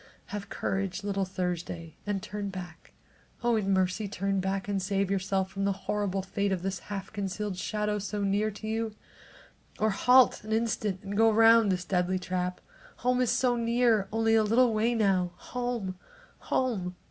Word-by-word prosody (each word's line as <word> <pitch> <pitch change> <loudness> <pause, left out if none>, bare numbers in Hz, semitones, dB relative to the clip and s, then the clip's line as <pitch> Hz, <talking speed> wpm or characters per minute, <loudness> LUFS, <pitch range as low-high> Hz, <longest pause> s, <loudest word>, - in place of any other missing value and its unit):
Have 200 -1 -5
courage, 195 0 -2
little 200 -1 -1
Thursday, 180 -3 -4
and 200 -2 -1
turn 205 -1 -4
back. 180 -4 -9 0.5
Oh, 240 -1 +3
in 200 -3 0
mercy 190 +2 +1
turn 195 0 -1
back 190 +1 -2
and 200 -1 -1
save 195 0 0
yourself 190 0 0
from 195 0 -3
the 200 0 +2
horrible 200 -2 -1
fate 200 +1 -1
of 185 -2 -1
this 190 -1 -2
half 195 -1 -5
concealed 200 0 -3
shadow 210 +2 -1
so 205 +1 -3
near 200 +2 +1
to 215 +1 -8
you 225 +1 0
now! 220 -2 -6 0.9
Or, - - +4
halt 250 +5 +5
an 215 +1 -3
instant 215 -4 0
and 200 +1 -5
go 225 +2 +5
round 225 -1 +6
this 180 -1 -1
deadly 180 +1 +1
trap. 180 0 -3 0.4
Home 250 0 +3
is 250 - +2
so 250 -2 +2
near, 230 -3 +2
only 225 +1 +2
a 225 - +6
little 230 +2 +4
way 225 +3 +2
now. 190 -5 +2
Home! 235 -6 -4 0.5
Home! 200 -9 0
200 Hz, 175 wpm, -29 LUFS, 190-220 Hz, 0.9 s, round